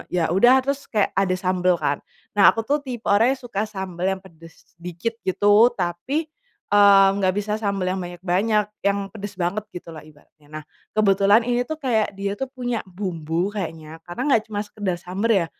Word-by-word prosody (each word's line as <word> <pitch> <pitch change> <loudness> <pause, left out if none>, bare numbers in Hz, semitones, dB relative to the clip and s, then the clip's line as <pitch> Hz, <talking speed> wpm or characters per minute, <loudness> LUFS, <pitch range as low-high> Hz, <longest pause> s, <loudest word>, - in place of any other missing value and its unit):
ya 170 -2 0
udah 240 +8 +6
terus 280 +1 -1
kayak 210 -3 +1
ada 190 -2 +1
sambel 185 -1 +1
kan, 140 0 0 0.3
nah 205 -1 +6
aku 225 - +1
tuh 290 +5 0
tipe 250 -5 -7
orang 230 +6 +4
yang - - -20
suka 215 -2 -3
sambel 190 -2 -3
yang - - -13
pedes 165 0 -17
dikit 180 +6 -4 0.2
gitu 205 +5 +5
tapi, 185 - -2 0.5
eee, 200 -1 +7
nggak 190 -2 +1
bisa 210 +1 -3
sambel 200 -3 -1
yang 190 - -3
banyak-banyak 185 +5 0 0.2
yang 200 0 +1
pedes 205 -2 -8
banget 185 +4 -2
gitulah 165 -3 -9
ibaratnya 150 0 -21
nah 155 0 -8 0.3
kebetulan 200 +2 +4
ini 245 0 0
tuh 315 - -3
kayak 225 -8 0
dia 200 0 -2
tuh 265 - -2
punya 245 -3 -3
bumbu 175 -1 -3
kayaknya 165 -5 -6
karena 175 +7 -7
nggak 225 - +4
cuma 205 -1 -3
sekedar 205 -4 -3
sambel 190 +6 -2
ya, - - -6
195 Hz, 180 wpm, -22 LUFS, 175-220 Hz, 0.5 s, eee